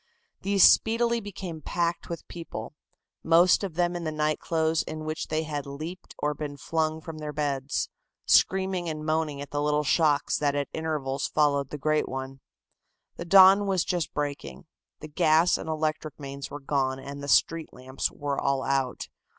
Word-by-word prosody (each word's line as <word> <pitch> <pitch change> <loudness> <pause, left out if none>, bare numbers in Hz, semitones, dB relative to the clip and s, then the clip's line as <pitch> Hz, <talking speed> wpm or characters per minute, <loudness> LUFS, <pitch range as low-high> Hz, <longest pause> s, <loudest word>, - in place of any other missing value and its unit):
These 200 -1 +3
speedily 235 +1 +4
became 185 -5 -7
packed 170 +2 -2
with 170 - -6
people, 150 -9 -7 0.5
most 170 +4 +5
of 185 -5 -4
them 175 0 +1
in 175 - -4
the 155 - -2
night 155 0 0
clothes 160 -1 +1
in 155 0 -6
which 155 0 -3
they 155 +1 -1
had 145 -2 -4
leaped 155 +6 -8
or 150 0 -1
been 145 -1 -6
flung 160 +2 -1
from 160 -1 -8
their 150 -1 -5
beds, 140 -2 -2 0.4
screaming 190 -2 +2
and 155 -1 -5
moaning 155 -2 -1
at 145 - -8
the 145 - -1
little 150 0 +1
shocks 150 -1 +2
that 145 -1 +1
at 145 -1 -2
intervals 145 -4 -2
followed 140 -2 +1
the 150 - -5
great 155 +2 0
one. 135 0 -6 0.8
The 170 - -6
dawn 195 +2 +7
was 190 -3 +1
just 175 -3 -1
breaking. 145 - -5 0.4
The 155 - -7
gas 155 +3 +3
and - - -5
electric 155 -1 -2
mains 140 0 -7
were 145 - -7
gone 135 -1 0
and 140 +1 -8
the 140 - -6
street 165 +3 +2
lamps 130 +1 -4
were 145 -1 -3
all 135 -1 0
out. 135 -2 -1
155 Hz, 175 wpm, -27 LUFS, 140-165 Hz, 0.8 s, dawn